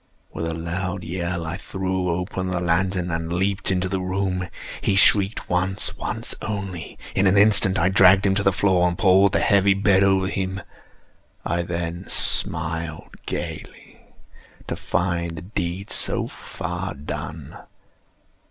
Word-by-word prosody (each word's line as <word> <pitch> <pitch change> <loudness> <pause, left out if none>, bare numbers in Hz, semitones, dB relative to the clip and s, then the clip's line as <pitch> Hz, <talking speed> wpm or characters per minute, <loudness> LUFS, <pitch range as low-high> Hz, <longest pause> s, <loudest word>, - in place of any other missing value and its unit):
With 80 - -3
a 80 - -3
loud 90 +3 -4
yell, 85 0 -3
I 80 - -4
threw 95 -1 -3
open 90 +2 -2
the 90 -1 -1
lantern 90 +1 0
and 80 0 -3
leaped 95 +2 0
into 95 -1 0
the 95 0 -2
room. 95 0 -2 0.3
He 100 - +1
shrieked 100 +2 +3
once—once 95 +2 -1
only. 95 -5 -5 0.2
In 95 +1 +2
an 95 +2 +3
instant 100 -2 +6
I 90 +2 +3
dragged 95 0 +6
him 95 - +3
to 100 - +1
the 95 - +3
floor, 95 -2 +2
and 85 -1 -2
pulled 95 0 +4
the - - +2
heavy 100 -1 +4
bed 100 -1 +3
over 95 -1 +3
him. 95 0 -3 0.9
I 85 +1 0
then 85 +1 -4
smiled 80 0 -1
gaily, - - -7 0.7
to - - -3
find 85 -2 -2
the 95 - -7
deed 95 0 -4
so - - 0
far - - -6
done. 70 +2 -7
95 Hz, 145 wpm, -23 LUFS, 85-95 Hz, 0.9 s, instant